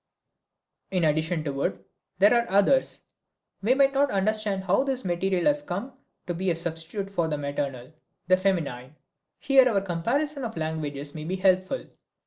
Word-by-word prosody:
In 180 -2 0
addition 155 +1 +1
to 145 -3 -3
wood 95 -8 -3 0.3
there 205 +5 +5
are 235 -1 +2
others. 205 +8 +3 0.6
We 230 +6 +3
might 275 0 +4
not 280 +1 +3
understand 205 0 +1
how 190 +7 +2
this 265 -4 -2
material 180 +1 0
has 295 0 +3
come 255 0 -5 0.3
to 175 - -3
be 185 +2 -1
a 170 - +1
substitute 170 +4 -4
for 170 -5 0
the 150 -2 -2
maternal, 140 -2 -4 0.3
the 185 0 +5
feminine. 155 -9 -2 0.4
Here 265 -2 +5
our 200 -4 +1
comparison 260 - -1
of 225 -6 -5
languages 150 -3 -4
may 155 -1 -7
be 180 +3 -2
helpful. 185 +5 +1
185 Hz, 160 wpm, -26 LUFS, 160-225 Hz, 0.6 s, there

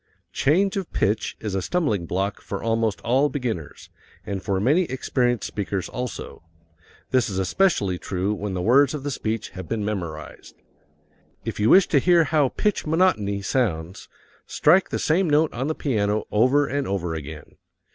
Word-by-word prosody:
Change 190 +7 +2
of 190 -3 -4
pitch 105 +3 -1
is 105 -3 -4
a 95 - 0
stumbling 110 - -1
block 95 +4 -2
for 100 - -6
almost 115 -2 0
all 135 +5 +2
beginners, 115 - -5 0.3
and 100 -1 -4
for 95 -2 -1
many 150 - +3
experienced 125 -3 -1
speakers 100 -2 -3
also. 125 -1 -6 0.7
This 130 -4 +2
is 95 - -4
especially 95 - +1
true 95 +2 -2
when 100 -2 -4
the 90 - -2
words 135 +6 +4
of 140 - -6
the 145 - -2
speech 115 -3 -3
have 95 -3 -9
been 110 -3 -2
memorized. 85 -7 -6 0.9
If - - -4
you 105 +2 +3
wish 190 0 +7
to 145 - +4
hear 175 +3 +4
how 150 -2 +2
pitch 210 +8 -1
monotony 110 - +1
sounds, 95 -8 -2 0.4
strike 175 +5 +3
the - - -2
same 170 +2 +1
note 150 +1 +3
on 130 +4 -2
the 155 - -1
piano 105 -6 0
over 130 +7 +3
and 140 0 -2
over 90 -4 -2
again. 75 -1 -8
115 Hz, 165 wpm, -23 LUFS, 100-145 Hz, 0.9 s, wish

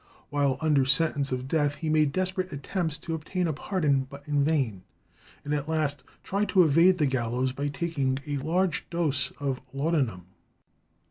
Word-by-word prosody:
While 140 -2 +1
under 150 -4 +3
sentence 140 +1 +2
of 130 0 -2
death 145 -1 +1
he 160 - -5
made 155 -2 +3
desperate 185 +2 -1
attempts 160 +2 -2
to 165 +1 -5
obtain 175 +3 -2
a 160 - 0
pardon, 145 -4 0
but 140 +1 -12
in 145 -1 +2
vain, 135 - 0 0.6
and 145 - -1
at 145 +1 -2
last 150 -3 0 0.2
tried 200 +2 -1
to 185 -3 +6
evade 165 +4 +5
the 155 - +2
gallows 130 -1 0
by 140 +3 -3
taking 140 -3 -1
a 145 -1 -2
large 165 +4 0
dose 145 -6 0
of 135 -3 -2
laudanum. 135 - 0
145 Hz, 170 wpm, -27 LUFS, 135-165 Hz, 0.6 s, to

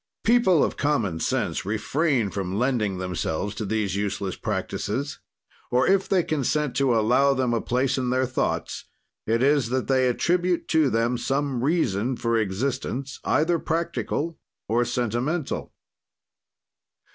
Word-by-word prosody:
"People 220 -9 +4
of - - -1
common 115 - 0
sense - - -1
refrain 115 - 0
from 95 -1 -3
lending 115 -6 0
themselves 90 +1 -2
to 110 +1 -4
these 100 -2 -1
useless 100 -2 -2
practises, 140 +7 -3 0.5
or, 125 +1 +3
if 195 0 +2
they 185 -3 +3
consent 150 -1 -1
to 135 -3 +3
allow 125 +5 +3
them 130 -2 0
a 115 - +1
place 130 +2 0
in 125 -1 -1
their 130 +1 +2
thoughts 130 +1 -2 0.4
it 115 +3 +2
is 140 -3 +3
that 130 0 -1
they 130 -1 +3
attribute 175 +7 +1
to 160 -4 +3
them 115 +2 0
some 135 -1 -1
reason 130 - +1
for 115 -1 0
existence, 125 +5 -2
either 165 +2 +2
practical 165 0 -2 0.3
or 120 +2 +2
sentimental." 120 +6 -2
125 Hz, 135 wpm, -25 LUFS, 110-145 Hz, 0.5 s, People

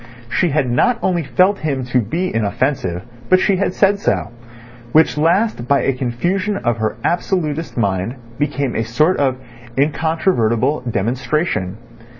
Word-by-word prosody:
She 180 - +2
had 145 -3 +1
not 170 - +2
only 175 -2 +1
felt 185 +7 +2
him 140 -5 -2
to 125 +1 +1
be 170 - -2
inoffensive, 105 -4 -1 0.3
but 185 - +6
she 190 0 +2
had 190 -1 -1
said 200 0 +3
so, 100 - -1 0.6
which 155 -5 +4
last 165 - +1
by 140 +1 +3
a 135 - +1
confusion 175 - -1
of 120 - -1
her 110 0 -2
absolutist 165 -4 -1
mind 100 +2 0 0.2
became 140 -3 -1
a 115 - 0
sort 150 +11 +2
of 135 -3 +1 0.4
incontrovertible 145 - +1
demonstration. 115 - -1
140 Hz, 145 wpm, -18 LUFS, 120-175 Hz, 0.6 s, but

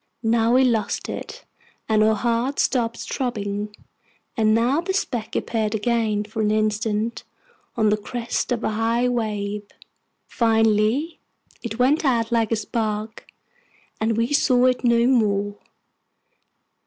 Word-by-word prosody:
Now 230 +1 +3
we 260 - +5
lost 225 -5 0
it, - - -7 0.4
and 215 -1 +3
our 220 0 +3
hearts 235 +5 0
stopped 235 -3 0
throbbing; 210 -4 -3 0.6
and 215 -1 +2
now 250 +7 +2
the 375 +2 -2
speck 240 - -3
appeared 220 -2 -1
again, 220 -1 0
for 215 +1 -5
an 210 - +2
instant, 215 +1 -1 0.5
on 215 -1 +3
the 210 - +2
crest 235 +4 -3
of 235 -2 -1
a - - 0
high 230 +3 +1
wave. 210 -4 -2 0.6
Finally, 225 +6 +1 0.4
it 225 -2 -5
went 270 +6 +3
out 235 -4 +1
like 230 -2 +1
a - - +3
spark, 215 0 -3 0.7
and 220 0 0
we 230 +4 0
saw 255 -3 +3
it 255 0 +2
no 235 -1 +3
more. 205 -5 +1
225 Hz, 135 wpm, -23 LUFS, 215-240 Hz, 0.7 s, we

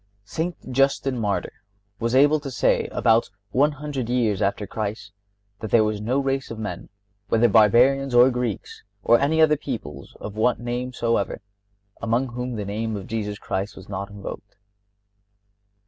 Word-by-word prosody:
St. 160 - -4
Justin, 135 -1 +1
Martyr, 105 -3 -1 0.5
was 115 +2 0
able 145 +3 +5
to 145 -1 -6
say, 125 - +1
about 115 -1 +2 0.2
one 145 +6 +3
hundred 140 -4 -4
years 115 -5 +1
after 100 +1 0
Christ, 105 -1 -5 0.5
that 110 - -5
there 110 +1 +5
was 105 -1 -1
no 120 +5 0
race 135 -1 -1
of 115 - -6
men, 100 -5 -6 0.4
whether 115 +3 +4
Barbarians 120 +5 +4
or 125 +2 +7
Greeks, 120 -4 -4 0.2
or 120 - +5
any 160 +3 +2
other 155 -1 +5
people 110 - -6
of 105 - -7
what 115 +3 +2
name 120 +1 -3
soever, 115 -4 -1 0.6
among 120 +3 0
whom 125 0 -4
the 105 -2 -4
name 110 +2 -3
of 100 -2 -6
Jesus 105 -2 -3
Christ 100 0 -4
was 95 - -12
not 100 0 -5
invoked. 100 0 -9
115 Hz, 160 wpm, -24 LUFS, 105-130 Hz, 0.6 s, or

